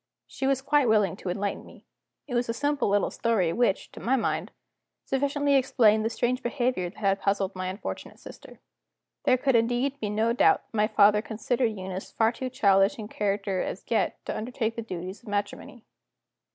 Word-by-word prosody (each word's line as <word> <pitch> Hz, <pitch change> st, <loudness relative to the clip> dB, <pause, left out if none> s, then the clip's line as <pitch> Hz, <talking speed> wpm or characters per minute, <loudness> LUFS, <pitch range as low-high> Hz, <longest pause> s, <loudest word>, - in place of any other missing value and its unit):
She 270 Hz, -, -4 dB
was 270 Hz, -1 st, +1 dB
quite 290 Hz, -2 st, +3 dB
willing 210 Hz, -5 st, +3 dB
to 190 Hz, -, -6 dB
enlighten 200 Hz, +2 st, -2 dB
me. -, -, -16 dB, 0.4 s
It 260 Hz, -, -8 dB
was 240 Hz, -1 st, 0 dB
a 230 Hz, -, -1 dB
simple 290 Hz, -1 st, 0 dB
little 205 Hz, 0 st, +1 dB
story 195 Hz, -8 st, +1 dB
which, 235 Hz, -5 st, 0 dB
to -, -, -11 dB
my 255 Hz, +3 st, +1 dB
mind, 255 Hz, -, -1 dB, 0.6 s
sufficiently 285 Hz, +1 st, 0 dB
explained 250 Hz, -5 st, +4 dB
the 225 Hz, -, 0 dB
strange 245 Hz, +2 st, -1 dB
behavior 240 Hz, -7 st, -1 dB
that 180 Hz, -, -19 dB
had 195 Hz, -1 st, 0 dB
puzzled 195 Hz, -1 st, 0 dB
my 185 Hz, 0 st, -3 dB
unfortunate 190 Hz, +3 st, -6 dB
sister. -, -, -13 dB, 0.7 s
There 255 Hz, -, +4 dB
could 265 Hz, 0 st, +1 dB
indeed 245 Hz, +4 st, +1 dB
be 210 Hz, -, -2 dB
no 220 Hz, +3 st, +1 dB
doubt 400 Hz, +11 st, +4 dB
that -, -, -10 dB
my 210 Hz, 0 st, +3 dB
father 210 Hz, 0 st, +5 dB
considered 225 Hz, +1 st, -1 dB
Eunice 185 Hz, 0 st, -6 dB
far 225 Hz, 0 st, +2 dB
too 255 Hz, +2 st, -5 dB
childish 200 Hz, -1 st, +3 dB
in 215 Hz, -2 st, -7 dB
character, 200 Hz, -3 st, -1 dB
as -, -, -5 dB
yet, 230 Hz, -, +1 dB
to -, -, -3 dB
undertake 225 Hz, 0 st, -3 dB
the 230 Hz, -, -3 dB
duties 185 Hz, -2 st, -7 dB
of 235 Hz, -, -12 dB
matrimony. 205 Hz, +3 st, -4 dB
225 Hz, 190 wpm, -27 LUFS, 200-255 Hz, 0.7 s, father